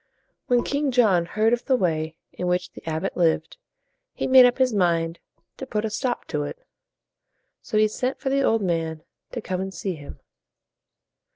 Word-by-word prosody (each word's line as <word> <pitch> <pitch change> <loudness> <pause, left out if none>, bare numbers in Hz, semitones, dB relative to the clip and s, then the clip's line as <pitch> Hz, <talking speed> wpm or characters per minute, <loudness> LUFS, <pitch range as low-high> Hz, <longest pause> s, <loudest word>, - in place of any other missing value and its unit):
When 245 -1 +3
King 285 0 0
John 200 -9 +3
heard 220 +5 +2
of 240 - -1
the 265 - +3
way 160 -6 -1 0.2
in 180 - -3
which 180 0 0
the - - -13
abbot 160 +4 -2
lived, 170 - +1 0.6
he - - -2
made 260 -1 +8
up 245 - 0
his 260 -3 +2
mind 170 -4 +1 0.4
to 265 - -7
put 210 0 -1
a 220 - -3
stop 245 +3 -2
to 150 - -1
it. 145 - -5 1.0
So 215 - -2
he 215 0 +5
sent 250 +5 -3
for 270 - -2
the 275 0 +2
old 225 -5 +2
man 165 -3 -2 0.3
to 240 - -3
come 185 -2 -3
and 190 0 -4
see 190 0 -3
him. 145 -3 -11
200 Hz, 185 wpm, -24 LUFS, 170-245 Hz, 1.0 s, made